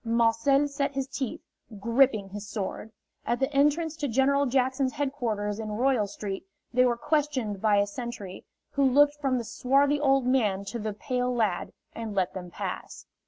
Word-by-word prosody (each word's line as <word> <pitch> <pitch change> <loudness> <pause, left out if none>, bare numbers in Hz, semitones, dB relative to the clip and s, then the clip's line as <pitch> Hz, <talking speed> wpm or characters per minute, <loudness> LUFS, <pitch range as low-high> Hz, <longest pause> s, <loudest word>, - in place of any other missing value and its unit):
Marcel 230 +5 +3
set 280 -1 -2
his 270 -1 -1
teeth, 270 -3 -4 0.4
gripping 230 -2 +2
his 205 +1 -7
sword. 215 +1 -4 0.3
At 240 - -1
the 270 +2 0
entrance 295 +3 +2
to 290 - -2
General 275 +3 +2
Jackson's 260 +1 +1
headquarters 235 -8 -2
in 215 -1 -4
Royal 245 -2 +2
Street 195 -1 -5 0.3
they 250 +1 +5
were 240 -1 +2
questioned 260 -9 -1
by 215 -2 +4
a 200 - +4
sentry, 205 -3 -7 0.3
who 280 - +1
looked 285 +2 +5
from 265 -3 +1
the 240 - -2
swarthy 275 +5 +2
old 270 -3 +3
man 215 -7 +1
to 210 +4 -5
the 215 -1 -3
pale 250 +4 -1
lad, 220 -7 0 0.2
and 225 -3 -5
let 185 -2 0
them 180 -1 -7
pass. - - -6
250 Hz, 170 wpm, -27 LUFS, 210-275 Hz, 0.4 s, they